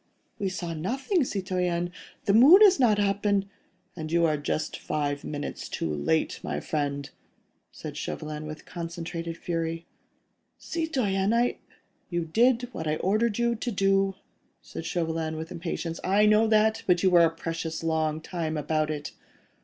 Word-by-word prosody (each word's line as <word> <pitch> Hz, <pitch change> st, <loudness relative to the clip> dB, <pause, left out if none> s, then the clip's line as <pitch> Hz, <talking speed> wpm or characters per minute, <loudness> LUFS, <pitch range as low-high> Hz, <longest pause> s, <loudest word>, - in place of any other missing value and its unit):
"We 195 Hz, -, 0 dB
saw 175 Hz, -3 st, -4 dB
nothing, 265 Hz, -, 0 dB
citoyen! 180 Hz, -5 st, -1 dB, 0.3 s
The 200 Hz, -, +3 dB
moon 295 Hz, -, +9 dB
is 385 Hz, -6 st, +6 dB
not 225 Hz, -5 st, +4 dB
yet 205 Hz, -, +3 dB
up, 200 Hz, +1 st, -2 dB
and.. 200 Hz, -1 st, +2 dB, 0.3 s
." -, -, -42 dB
"And 160 Hz, -2 st, -6 dB
you 170 Hz, 0 st, +3 dB
are 155 Hz, -2 st, +2 dB
just 150 Hz, +1 st, -3 dB
five 145 Hz, -1 st, -2 dB
minutes 145 Hz, -1 st, -5 dB
too 80 Hz, -, -2 dB
late, 75 Hz, +2 st, 0 dB
my 75 Hz, -, -3 dB
friend," 140 Hz, -, -2 dB, 0.6 s
said -, -, -8 dB
Chauvelin, 155 Hz, 0 st, -5 dB
with 155 Hz, 0 st, -8 dB
concentrated 170 Hz, -1 st, -5 dB
fury. 165 Hz, -1 st, -3 dB, 0.7 s
"Citoyen... 230 Hz, -, 0 dB
I.. 240 Hz, +1 st, +1 dB, 0.2 s
." -, -, -43 dB
"You 175 Hz, -2 st, -1 dB
did 240 Hz, +8 st, +3 dB
what 160 Hz, -8 st, -5 dB
I 155 Hz, -, +1 dB
ordered 210 Hz, +5 st, +1 dB
you 235 Hz, 0 st, +2 dB
to 235 Hz, +2 st, -3 dB
do," 195 Hz, -1 st, +2 dB, 0.5 s
said -, -, -7 dB
Chauvelin, 165 Hz, -2 st, -2 dB
with 160 Hz, +1 st, -6 dB
impatience. 165 Hz, -1 st, -4 dB
"I 200 Hz, +3 st, +4 dB
know 215 Hz, +1 st, +5 dB
that, 220 Hz, 0 st, +3 dB
but 180 Hz, -1 st, +3 dB
you 190 Hz, -, +4 dB
were 175 Hz, -1 st, +7 dB
a -, -, +3 dB
precious 165 Hz, 0 st, -4 dB
long 160 Hz, -1 st, 0 dB
time 160 Hz, -2 st, -3 dB
about 155 Hz, +1 st, 0 dB
it. 150 Hz, -1 st, -4 dB
175 Hz, 165 wpm, -27 LUFS, 160-210 Hz, 0.7 s, moon